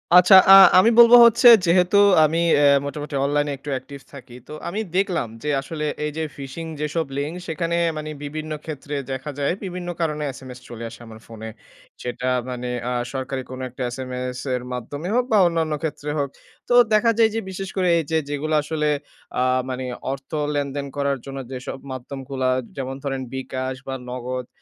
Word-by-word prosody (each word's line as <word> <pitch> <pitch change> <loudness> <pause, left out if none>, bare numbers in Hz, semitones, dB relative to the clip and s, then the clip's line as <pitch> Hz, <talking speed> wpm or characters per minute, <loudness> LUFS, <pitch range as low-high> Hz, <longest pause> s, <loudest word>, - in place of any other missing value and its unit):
আচ্ছা 180 +2 +8 0.2
আ - - +12 0.3
আমি 225 - +5
বলব 235 0 +8
হচ্ছে 235 +1 +5 0.2
যেহেতু 180 +3 +3 0.3
আমি 165 +2 0 0.2
এ - - +6 0.2
মোটামুটি 145 +1 -5
অনলাইনে 145 0 0
একটু 145 +2 -9
অ্যাকটিভ 135 +2 -6
থাকি। 125 -3 -12
তো - - -9
আমি 200 +5 -3 0.2
দেখলাম 185 - 0 0.2
যে 150 - -2
আসলে 150 +2 -5 0.2
এই 150 - -2
যে 160 - -1
phishing 140 +4 -7
যেসব 150 +2 -1
লিঙ্ক 145 +3 -2
সেখানে 165 +1 -2 0.2
মানে 155 0 -5
বিভিন্ন 155 +2 -6
ক্ষেত্রে 145 -1 -6 0.2
দেখা 130 +3 -4
যায় 140 +4 +1
বিভিন্ন 180 -2 -5
কারণে 150 -2 -1
এসএমএস 130 -1 -11
চলে 115 -1 -8
আসে 115 - -13
আমার 110 0 -12
ফোনে। 110 -1 -8 0.5
সেটা 125 +1 -4 0.2
মানে 125 0 -5 0.2
আ - - -2 0.2
সরকারি 135 0 -3
কোনো 130 0 -7
একটা 125 +1 -10
এসএমএস 125 0 -5 0.2
এর 125 - -4
মাধ্যমে 145 +7 -6
হোক 250 - +2
বা 215 - +5
অন্যান্য 165 -2 -1
ক্ষেত্রে 150 -1 -4
হোক। 140 -1 -1 0.4
তো 245 - +2 0.2
দেখা 230 +2 +4
যায় 225 -1 +5
যে 225 - +1
বিশেষ 190 0 -6
করে 185 -1 +2
এই 165 - 0
যে 160 - +3
যেগুলা 155 +2 -1
আসলে 150 0 -1 0.5
আ - - +3 0.3
মানে 130 0 -4 0.3
অর্থ 135 0 -8 0.2
লেনদেন 140 0 -2
করার 140 -1 0
জন্য 135 0 -6
যেসব 130 +1 -6
মাধ্যমগুলা 130 0 -4 0.3
যেমন 135 0 -4
ধরেন 135 -2 -3
bKash 130 0 -4
বা 135 - -3
Nagad 125 0 -5
145 Hz, 180 wpm, -22 LUFS, 130-160 Hz, 0.5 s, আ